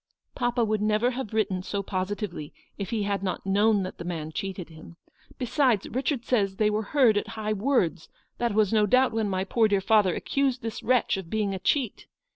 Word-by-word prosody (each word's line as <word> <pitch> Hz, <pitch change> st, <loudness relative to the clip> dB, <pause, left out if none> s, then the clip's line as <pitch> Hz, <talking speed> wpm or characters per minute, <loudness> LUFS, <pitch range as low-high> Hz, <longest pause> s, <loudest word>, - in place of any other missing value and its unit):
" -, -, -52 dB
Papa 240 Hz, -1 st, +1 dB
would 215 Hz, -1 st, 0 dB
never 215 Hz, +3 st, +2 dB
have 255 Hz, -4 st, -5 dB
written 205 Hz, -4 st, 0 dB
so 200 Hz, +2 st, -3 dB
positively, 185 Hz, -4 st, -4 dB, 0.2 s
if 200 Hz, -3 st, -5 dB
he 220 Hz, -3 st, -1 dB
had 200 Hz, -1 st, -1 dB
not 190 Hz, -1 st, -3 dB
known 205 Hz, +1 st, +3 dB
that 185 Hz, -, -7 dB
the -, -, -5 dB
man 165 Hz, -3 st, -4 dB
cheated 185 Hz, 0 st, -5 dB
him. 165 Hz, +1 st, -13 dB, 0.4 s
Besides, 250 Hz, -4 st, +1 dB
Ptichard 260 Hz, 0 st, -2 dB
says 200 Hz, -6 st, +1 dB
they 210 Hz, +1 st, +2 dB
were 210 Hz, +1 st, 0 dB, 0.2 s
heard 235 Hz, -6 st, +5 dB
at -, -, -7 dB
high 215 Hz, 0 st, -1 dB
words; 200 Hz, -, 0 dB, 0.3 s
that 235 Hz, -3 st, 0 dB
was 215 Hz, -1 st, +3 dB
no 210 Hz, -1 st, +4 dB
doubt 255 Hz, +4 st, +4 dB
when 220 Hz, -2 st, -1 dB
my 190 Hz, -1 st, -1 dB
poor 220 Hz, +3 st, +2 dB
dear 200 Hz, -2 st, +2 dB
father 195 Hz, -2 st, +3 dB
accused 270 Hz, -2 st, -1 dB
this 225 Hz, -1 st, -4 dB
wretch 250 Hz, -4 st, +2 dB
of 190 Hz, -4 st, -7 dB
being 210 Hz, -1 st, -1 dB
a 190 Hz, -, -4 dB
cheat. 245 Hz, +3 st, -1 dB
210 Hz, 210 wpm, -26 LUFS, 190-230 Hz, 0.4 s, heard